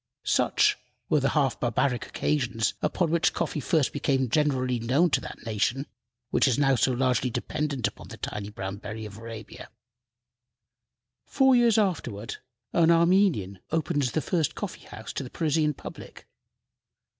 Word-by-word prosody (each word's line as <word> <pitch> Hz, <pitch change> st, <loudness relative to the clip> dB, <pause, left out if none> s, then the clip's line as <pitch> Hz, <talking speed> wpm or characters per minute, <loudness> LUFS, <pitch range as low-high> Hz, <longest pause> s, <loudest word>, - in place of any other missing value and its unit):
Such -, -, +3 dB, 0.3 s
were 150 Hz, -, +4 dB
the 135 Hz, -, +1 dB
half 135 Hz, -4 st, +1 dB
barbaric 120 Hz, 0 st, 0 dB
occasions 120 Hz, -7 st, 0 dB
upon 170 Hz, -4 st, 0 dB
which 170 Hz, 0 st, +2 dB
coffee -, -, -1 dB
first 155 Hz, -2 st, +1 dB
became 135 Hz, -3 st, 0 dB
generally 130 Hz, -5 st, +1 dB
known 135 Hz, +9 st, +2 dB
to -, -, +2 dB
that -, -, -9 dB
nation 115 Hz, +5 st, 0 dB, 0.5 s
which -, -, +3 dB
is 130 Hz, -, +2 dB
now 140 Hz, -1 st, +3 dB
so 130 Hz, +1 st, +2 dB
largely 125 Hz, 0 st, +1 dB
dependent 140 Hz, +2 st, -2 dB
upon -, -, -10 dB
the -, -, -10 dB
tiny 100 Hz, -1 st, -5 dB
brown 95 Hz, -1 st, -5 dB
berry 110 Hz, +1 st, -7 dB
of 105 Hz, 0 st, -9 dB
Arabia. 115 Hz, -1 st, -9 dB, 1.6 s
Four 265 Hz, -1 st, +4 dB
years 235 Hz, -3 st, +4 dB
afterward 135 Hz, -, -1 dB, 0.4 s
an 170 Hz, -1 st, +4 dB
Armenian 170 Hz, -, +3 dB
opened 155 Hz, -2 st, 0 dB
the 135 Hz, +4 st, 0 dB
first 165 Hz, -1 st, 0 dB
coffee 205 Hz, -4 st, -6 dB
house 110 Hz, +1 st, -8 dB
to -, -, -3 dB
the 125 Hz, -, -8 dB
Parisian 155 Hz, -1 st, 0 dB
public. -, -, -10 dB
135 Hz, 150 wpm, -27 LUFS, 115-160 Hz, 1.6 s, were